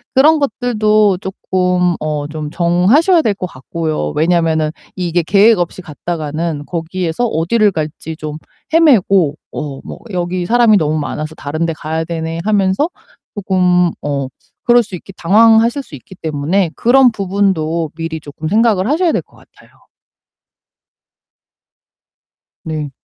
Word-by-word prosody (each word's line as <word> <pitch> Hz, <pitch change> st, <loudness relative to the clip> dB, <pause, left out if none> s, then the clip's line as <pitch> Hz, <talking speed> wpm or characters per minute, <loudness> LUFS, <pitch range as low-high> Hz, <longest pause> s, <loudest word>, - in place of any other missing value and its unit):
그런 300 Hz, +4 st, +5 dB
것들도 215 Hz, -7 st, +1 dB
쪼끔 180 Hz, -2 st, 0 dB
어 150 Hz, -1 st, -2 dB
좀 150 Hz, -1 st, -5 dB
정하셔야 190 Hz, -, +3 dB
될 220 Hz, -8 st, 0 dB
것 185 Hz, -, -4 dB
같고요. 155 Hz, -, -4 dB
왜냐면은 160 Hz, -1 st, +1 dB, 0.2 s
이게 175 Hz, -1 st, 0 dB
계획 200 Hz, +4 st, +4 dB
없이 175 Hz, +1 st, -3 dB
갔다가는 155 Hz, -1 st, -4 dB
거기에서 170 Hz, +4 st, -2 dB
어디를 210 Hz, +4 st, +2 dB
갈지 160 Hz, -1 st, -5 dB
좀 155 Hz, 0 st, -6 dB, 0.4 s
헤매고 200 Hz, -, +4 dB, 0.2 s
어 145 Hz, -3 st, -5 dB
뭐 -, -, -9 dB
"여기 175 Hz, 0 st, -2 dB
사람이 235 Hz, -2 st, +4 dB
너무 155 Hz, -3 st, 0 dB
많아서 155 Hz, +1 st, -4 dB
다른 155 Hz, +3 st, -3 dB
데 165 Hz, -, -2 dB
가야 160 Hz, +2 st, -3 dB
되네." 165 Hz, 0 st, -4 dB
하면서 205 Hz, -, +1 dB, 0.5 s
쪼끔 180 Hz, -3 st, +2 dB
어 140 Hz, -2 st, -2 dB, 0.4 s
그럴 240 Hz, 0 st, +5 dB
수 200 Hz, -4 st, -7 dB
있기 195 Hz, +3 st, -11 dB
당황하실 225 Hz, +7 st, +4 dB
수 -, -, -20 dB
있기 145 Hz, +7 st, -11 dB
때문에 160 Hz, +3 st, -1 dB
그런 255 Hz, +1 st, +4 dB
부분도 185 Hz, -6 st, -1 dB
미리 165 Hz, -1 st, -4 dB
쪼끔 150 Hz, +1 st, -7 dB
생각을 215 Hz, 0 st, +2 dB
하셔야 330 Hz, +3 st, +2 dB
될 -, -, 0 dB
것 -, -, -26 dB
같아요. -, -, -22 dB, 3.0 s
네. 155 Hz, -3 st, -4 dB
175 Hz, 275 characters per minute, -16 LUFS, 160-210 Hz, 3.0 s, 그런